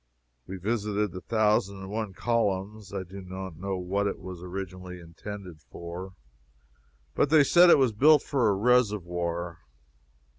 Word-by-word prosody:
We 95 - -6
visited 105 0 -1
the 95 - -7
Thousand 105 -3 +1
and 95 0 -8
One 110 -2 -3
Columns. 105 -2 -1
I 100 -2 -3
do 95 +2 -10
not 95 -1 -7
know 95 +2 -3
what 100 +3 -1
it 100 - -3
was 90 -2 -9
originally 90 0 -7
intended 90 0 -9
for, 85 +4 -8 1.0
but 140 - +2
they 155 -1 +6
said 175 +5 +6
it - - +8
was 130 -4 +3
built 145 +6 +5
for 130 -6 +1
a 100 - +2
reservoir. 90 -7 0
95 Hz, 150 wpm, -27 LUFS, 90-110 Hz, 1.0 s, it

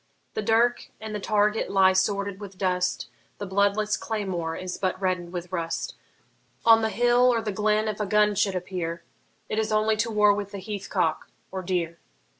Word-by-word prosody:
The - - -2
dirk 230 +3 +2
and 220 0 -6
the 210 - -2
target 210 +1 +1
lie 190 -1 +5
sordid 200 +1 0
with 195 -2 -9
dust, 180 -1 0 0.3
The 205 - -5
bloodless 200 +2 +1
claymore 185 -7 -3
is 185 -1 -5
but 185 -1 -1
redden'd 180 -2 -1
with 180 0 -6
rust; 165 -2 -3 0.7
On 225 -1 +7
the 220 - +1
hill 240 +3 +4
or 235 - +1
the 220 -2 -3
glen 215 +2 +1
if 215 -1 -3
a 210 - -1
gun 210 +1 +3
should 200 -1 +1
appear, 175 -2 -4 0.4
It 215 - -1
is 220 0 -1
only 215 0 +2
to 230 +2 0
war 210 -2 +4
with 205 -1 -5
the - - -4
heath 200 0 -6
cock 165 -4 0 0.2
or 190 0 -4
deer. 175 -2 -2
200 Hz, 190 wpm, -26 LUFS, 185-215 Hz, 0.7 s, On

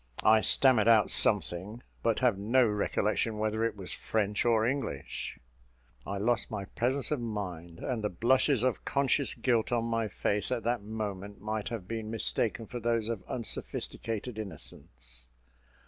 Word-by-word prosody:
I 110 0 +6
stammered 120 +1 +4
out 110 -3 +5
something, 100 +4 +3 0.2
but 115 -2 +1
have 125 -5 +4
no 115 +6 +3
recollection 105 +1 0
whether 110 +1 0
it 115 -2 -1
was 95 -2 -6
French 105 -1 -1
or 115 -2 +3
English. 130 - -3 0.7
I 100 - -3
lost 115 +4 0
my 100 - -4
presence 130 +8 -1
of 150 - +1
mind, 90 -7 -5
and 120 0 -3
the 105 - +1
blushes 125 - +2
of 130 -2 0
conscious 140 0 +1
guilt 120 -3 +1
on 120 -1 +1
my 115 -1 0
face 105 +2 -1
at 120 -3 -1
that 120 0 0
moment, 100 -2 -5
might 110 0 -3
have 110 -6 -5
been 110 -1 -4
mistaken 115 +1 0
for 120 - -6
those 115 -1 0
of 115 -5 -3
unsophisticated 115 -1 -3
innocence. 60 - -9
110 Hz, 155 wpm, -30 LUFS, 100-120 Hz, 0.7 s, I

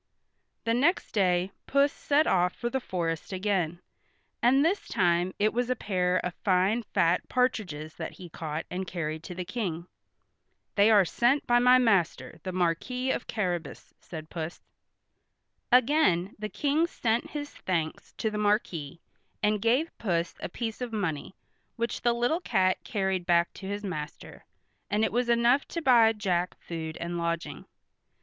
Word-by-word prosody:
The 230 - +1
next 290 +10 +2
day 185 -2 +2 0.2
Puss 280 +1 +3
set 295 +2 +2
off 180 0 +2
for 240 0 -3
the 265 - 0
forest 170 -8 -3
again, 185 -3 -1 0.6
and 270 +5 +4
this 380 +5 0
time 175 0 +2
it 215 +1 +2
was 245 +1 0
a 255 - +2
pair 185 -5 0
of 180 - -2
fine 195 +3 +3
fat 175 -5 +1
partridges 185 -12 -1
that - - -5
he 185 - -10
caught 160 -1 -5
and 185 +1 -3
carried 160 -3 -3
to 180 - -7
the 180 0 -4
King. 175 -7 -3 0.9
"They 205 +1 +5
are 205 -4 +6
sent 245 - +2
by 240 0 +4
my 250 +1 +6
master, 195 -8 +1
the 185 - -4
Marquis 185 +9 0
of - - -3
Carrabas," 175 -8 -3
said 155 -2 -9
Puss. 165 0 -5 1.1
Again 245 - +3
the 215 0 -4
King 300 +7 +1
sent 235 -7 -1
his 290 -1 -5
thanks 165 -4 -3
to 220 - -2
the 210 - -3
Marquis, 180 -8 0 0.4
and 210 -1 +2
gave 250 +9 +1
Puss 175 -5 -1
a - - -5
piece 225 +5 -5
of 245 -2 -3
money, 190 -6 -3 0.4
which 235 0 -2
the 240 -1 +3
little 245 +9 0
cat 185 - +1
carried 190 -4 -1
back 170 0 +3
to 190 - -8
his 205 +1 -4
master, 155 -6 -7 0.4
and 210 +1 +1
it - - +1
was 240 +1 0
enough 235 +3 +3
to 335 - -4
buy 240 -7 +6
Jack 185 -5 -1
food 160 -2 -6
and 170 0 -4
lodging. 170 0 -3
200 Hz, 160 wpm, -28 LUFS, 175-240 Hz, 1.1 s, are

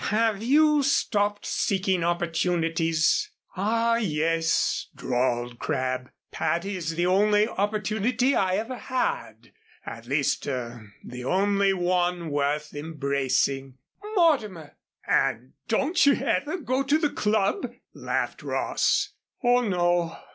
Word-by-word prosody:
Have 215 -1 +1
you 300 +4 +4
stopped 205 -6 +1
seeking 190 -3 0
opportunities?" 165 - +1 0.3
"Ah, 230 +4 +1
yes," 165 -4 0
drawled 120 -1 -1
Crabb, 130 -1 -2 0.2
"Patty 170 +5 -1
is 165 -3 -3
the 175 +1 +1
only 210 +3 +3
opportunity 215 +5 0
I 185 -5 +1
ever 225 +5 -3
had 255 0 -3 0.3
at - - -8
least - - 0
er 120 -5 -5
the 125 0 -8
only 195 +5 +2
one 175 -2 0
worth 145 +1 -1
embracing 140 -3 -1
" 420 +2 -10
"Mortimer!" 215 - +1 0.3
"And 130 -1 0
don't 280 +10 +2
you 280 -1 +5
ever 295 +6 -1
go 265 -5 -1
to 285 +2 +2
the 305 -2 0
Club?" 210 - 0 0.2
laughed - - -3
Ross. - - 0 0.3
"Oh, 245 0 +4
no. 175 -5 0
185 Hz, 115 wpm, -26 LUFS, 155-225 Hz, 0.3 s, you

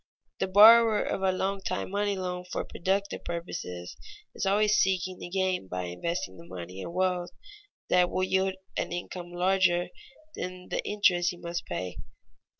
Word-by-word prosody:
_ - - -63
The - - 0
borrower 220 +3 +8
of - - -2
a 190 -1 +3
long 195 +1 -1
time 190 - -3
money 205 0 0
loan 180 -1 -3
for 180 - -4
productive 195 +3 -2
purposes 90 - -5 0.4
is - - -2
always 210 +2 +3
seeking 185 -3 +1
to - - -6
gain 185 - 0
by 90 0 -3
investing 145 - -3
the 165 - -12
money 90 - -7
in - - -6
wealth 180 0 0 0.6
that 180 -1 +4
will 185 - -1
yield 190 0 +1 0.2
an - - -2
income 175 0 -5
larger 180 -1 +2 0.4
than 180 0 -6
the - - -2
interest 180 -4 +3
he 180 - -6
must 170 0 -5
pay. 90 -1 -4
185 Hz, 165 wpm, -28 LUFS, 175-195 Hz, 0.6 s, borrower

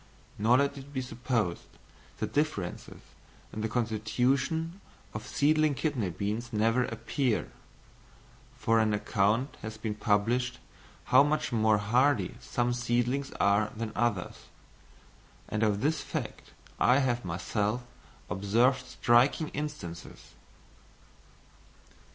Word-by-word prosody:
Nor 115 +4 +5
let 140 0 0
it 135 +1 -12
be 135 - -3
supposed 120 -7 -2 0.5
that - - -4
differences 145 - -2 0.5
in 110 - -4
the 110 - -1
constitution 130 - 0 0.3
of 110 - -6
seedling 155 0 +2
kidney 130 - -1
beans 105 +7 -3
never 115 +3 +2
appear, 130 -6 -1 1.1
for 115 0 +2
an 110 -1 +2
account 105 +6 0
has 110 0 -6
been 110 -1 -3
published 115 +4 +1 0.6
how - - +9
much 150 +2 +1
more 110 -2 +3
hardy 125 +8 +2
some 120 -1 -1
seedlings 120 +3 0
are 100 +1 +2
than 115 -1 -3
others; 105 -6 -1 1.0
and 105 - -2
of 105 -2 +2
this 150 +1 +1
fact - - -6 0.3
I 125 - +5
have 125 -3 +1
myself 105 +7 -1 0.4
observed 120 +8 +2
striking 125 +6 +3
instances. 145 - -7
120 Hz, 110 wpm, -29 LUFS, 105-135 Hz, 1.1 s, how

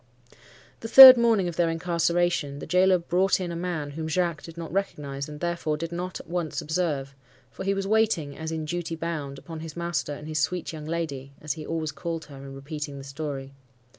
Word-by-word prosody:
"The 225 - -6
third 260 +2 +12
morning 230 -6 +2
of 170 - -5
their 170 -1 +2
incarceration, 170 -2 0
the - - -7
gaoler 185 +1 +4
brought 180 +3 +1
in 180 -2 -3
a - - -5
man 165 -4 -3
whom 160 +2 -5
Jacques 170 0 0
did 165 0 -11
not 165 -1 -7
recognize, 145 -8 -3
and 150 0 -9
therefore 170 -3 -2
did 165 +1 -5
not 180 +1 -4
at - - -12
once 170 -2 -3
observe; 150 -4 -2 0.4
for - - -7
he 195 +1 0
was 195 0 -2
waiting, 205 -9 +1
as 160 0 -5
in 160 -1 -3
duty 170 +1 -3
bound, 155 -4 -4
upon 165 +2 -9
his 160 0 -8
master 170 -3 -2
and 150 - -10
his 155 -1 -2
sweet 175 +3 -1
young 155 -1 -7
lady 140 -5 -4
(as 150 -2 -3
he 155 -1 -9
always 160 -2 -2
called 165 -2 -5
her 140 -2 -12
in 135 0 -9
repeating 145 +1 -6
the 135 - -8
story). 135 -1 -6
165 Hz, 210 wpm, -26 LUFS, 150-175 Hz, 0.4 s, third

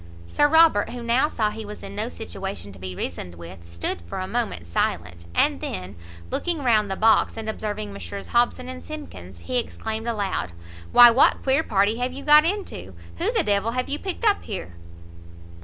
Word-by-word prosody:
Sir 290 - +2
Robert, 320 -8 +5
who 245 -1 -7
now 240 +5 +3
saw 215 -6 0
he 220 +1 -7
was 210 0 -9
in 195 0 -8
no 215 +3 -2
situation 195 - -7
to 95 - -14
be 90 0 -6
reasoned 90 0 -5
with, 85 0 -11
stood 85 +1 -3
for 85 - -7
a 185 - -2
moment 230 - -3
silent; 85 0 -2
and - - +2
then, 90 +1 -5 0.4
looking 335 -5 -1
round 215 -5 +3
the 190 - -1
box, 220 +2 +3
and 220 -1 -5
observing 210 - -4
Messrs 100 0 -8
Hobson 245 +1 +1
and 255 0 -7
Simkins, 95 - -9
he 250 - -1
exclaimed 220 -1 -5
aloud 200 - -2 0.4
"Why 240 -1 +9
what 250 +4 +4
queer 270 +3 +3
party 205 -4 +1
have 250 +1 -1
you 280 +1 -8
got 300 +1 +7
into? 330 - -3 0.2
who - - +1
the - - +2
d 210 - 0
l 200 +2 +1
have 255 0 -1
you 290 +2 -1
picked 385 +4 -4
up 415 -2 +4
here?" 185 - -6
215 Hz, 195 wpm, -24 LUFS, -, 0.4 s, Why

